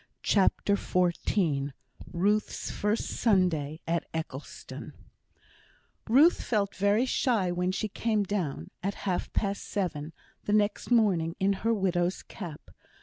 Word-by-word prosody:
CHAPTER 200 0 +3
XIV 170 -6 0 0.4
Ruth's 205 +5 0
First 210 +2 0
Sunday 170 -8 +1
at 170 0 -1
Eccleston 155 -4 -6 1.2
Ruth 290 +9 +6
felt 205 -4 0
very 205 +5 +2
shy 230 -8 +1
when 180 +1 0
she 200 +3 -2
came 215 0 0
down 175 - -3
(at 200 +2 -2
half 185 -3 -1
past 200 -1 -1
seven) 165 -6 -3 0.3
the 205 - 0
next 210 -1 +1
morning, 190 -9 +3
in 195 +1 +3
her 230 - +2
widow's 185 -4 0
cap. 170 -8 -9
195 Hz, 120 wpm, -29 LUFS, 170-210 Hz, 1.2 s, Ruth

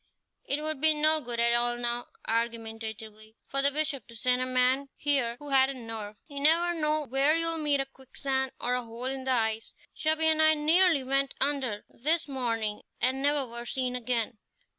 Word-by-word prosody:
"It 290 +2 -1
would 310 -3 -3
be 315 -1 +5
no 310 +1 +4
good 240 -3 -5
at 235 0 +3
all 240 0 +1
now" 240 0 -3 0.2
argumentatively 225 -1 -4
"for 275 - 0
the 280 - +5
Bishop 290 -4 -2
to 235 - -13
send 250 +3 +1
a 255 - -1
man 255 +2 +1
here 270 -5 +1
who 290 +2 -10
hadn't 265 -2 +2
nerve. 215 -2 -7
You 285 -3 -7
never 335 +4 +4
know 305 -2 0
where 275 +4 +2
you'll 330 0 0
meet 295 -2 +1
a - - -3
quicksand, 265 0 -3
or 245 - -1
a 250 - 0
hole 230 +2 -8
in 265 0 -3
the 260 - +1
ice. 225 -2 -1 0.2
Chubby 315 +1 +2
and 315 0 +4
I 315 0 +6
nearly 320 0 +3
went 275 +1 0
under 265 -7 0
this 315 +5 0
morning 230 -6 -2 0.2
and 260 +2 0
never 285 -1 +1
were 235 0 -9
seen 255 -1 -2
again. 235 -2 -2
265 Hz, 190 wpm, -28 LUFS, 235-295 Hz, 0.2 s, I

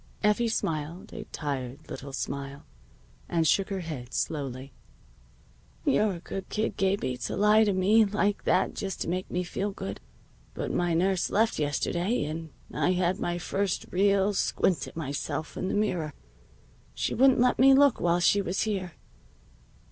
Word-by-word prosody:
Effie 210 +3 +3
smiled 175 -1 -3
a 215 -2 -7
tired 140 -3 -5
little 140 0 -7
smile, 140 +1 -5 0.6
and 165 -2 +2
shook 195 +4 +2
her 195 -2 -2
head 140 -7 -6
slowly. 135 -3 -3 1.1
"You're 215 -8 +3
a - - -8
good 190 +2 -6
kid, 220 +1 -1
Gabie, 190 -10 0
to - - -3
lie 210 +1 +5
like 205 0 +3
that 185 - +2
just 195 -2 -4
to - - -2
make 185 +2 -2
me 180 - -1
feel 195 +3 -3
good. 100 - -6 0.5
But - - -3
my 175 -1 +1
nurse 185 +2 +1
left 220 -2 +1
yesterday 170 +7 0
and 160 +2 -5 0.2
I 180 - +2
had 180 0 0
my 175 0 -1
first 195 +2 -1
real 200 +1 +3
squint 185 -2 +1
at - - -12
myself 150 +1 -4
in - - -3
the - - -1
mirror. 180 -8 0 0.8
She - - -1
wouldn't 265 0 +5
let 250 +1 +3
me 270 +1 +7
look 280 -2 +4
while 175 0 +2
she 200 +3 +4
was 190 0 -1
here. 190 -5 -2
185 Hz, 155 wpm, -28 LUFS, 155-205 Hz, 1.1 s, me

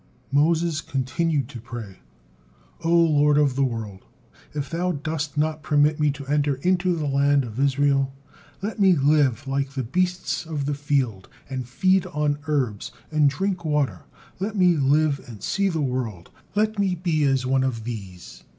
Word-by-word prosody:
'" - - -34
Moses 160 +2 +2
continued 140 +1 -1
to 120 -5 -9
pray: 115 -5 -8 0.8
"O 165 - 0
Lord 150 -4 +4
of 145 -3 +3
the 140 - +2
world! 110 -6 -4 0.5
If 145 -2 -4
thou 175 +2 -1
dost 150 0 -4
not 155 +1 0
permit 150 0 +2
me 150 -1 +3
to 140 -1 -9
enter 145 0 +1
into 180 +5 +1
the 155 -2 -2
land 140 0 +3
of 115 0 -7
Israel, 140 0 +2 0.5
let 215 +2 -4
me 190 -2 +6
live 140 -2 +2
like 135 0 -1
the 135 -2 -2
beasts 180 +10 -1
of 150 -4 -3
the 145 - 0
field, 140 -9 -1 0.2
and 130 -2 -4
feed 185 +6 +2
on 150 -4 -1
herbs, 130 -9 -1 0.2
and 150 -2 +4
drink 185 +4 -2
water, 150 -3 -1 0.3
let 205 +3 -3
me 180 -3 +4
live 145 0 +2
and 110 -5 -10
see 200 -1 +1
the 165 -4 -1
world: 125 -9 -3 0.2
let 215 0 +1
me 195 -2 +1
be 165 -3 0
as 135 -2 +1
one 130 0 +2
of 120 -4 -2
these." 100 -6 -8
145 Hz, 170 wpm, -24 LUFS, 130-165 Hz, 0.8 s, me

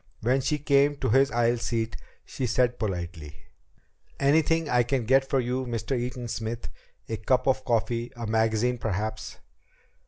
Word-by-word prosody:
When 130 +4 +2
she 145 +3 0
came 145 0 +3
to 130 -3 -2
his 135 +4 +4
aisle 120 +1 +1
seat, 115 -1 -2 0.3
she 130 - -3
said 125 +1 +1
politely: 85 -7 -4 0.8
"Anything 160 +3 +3
I 125 -3 +3
can 120 0 -1
get 135 +3 +3
for 135 - +2
you, 125 +1 -2
Mr. 115 +2 -2
Eaton 125 0 -3
Smith? 115 -5 -4 0.4
A 110 - -3
cup 125 +4 +1
of 130 -1 +1
coffee? 120 0 -1
A 120 -1 -5
magazine 110 +2 +1
perhaps?" 110 +1 -3
120 Hz, 155 wpm, -27 LUFS, 110-130 Hz, 0.8 s, his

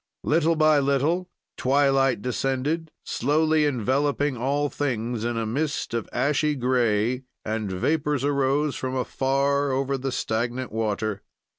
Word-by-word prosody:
"Little 165 +1 +2
by 155 -1 +4
little 145 +6 +1 0.3
twilight 135 -3 +2
descended, 135 +6 -1
slowly 155 +3 +2
enveloping 140 +2 0
all 140 +5 0
things 120 -5 -2
in 120 0 -1
a 115 - -1
mist 145 +4 -2
of 115 -2 -2
ashy 150 +3 +1
gray, 125 -2 +1 0.2
and 110 -2 -2
vapors 145 - 0
arose 140 +1 +1
from 130 0 -3
afar 140 +2 +1
over 135 +1 -1
the 135 +1 -2
stagnant 120 +2 -2
water. 110 -2 -2
135 Hz, 125 wpm, -25 LUFS, 120-145 Hz, 0.3 s, by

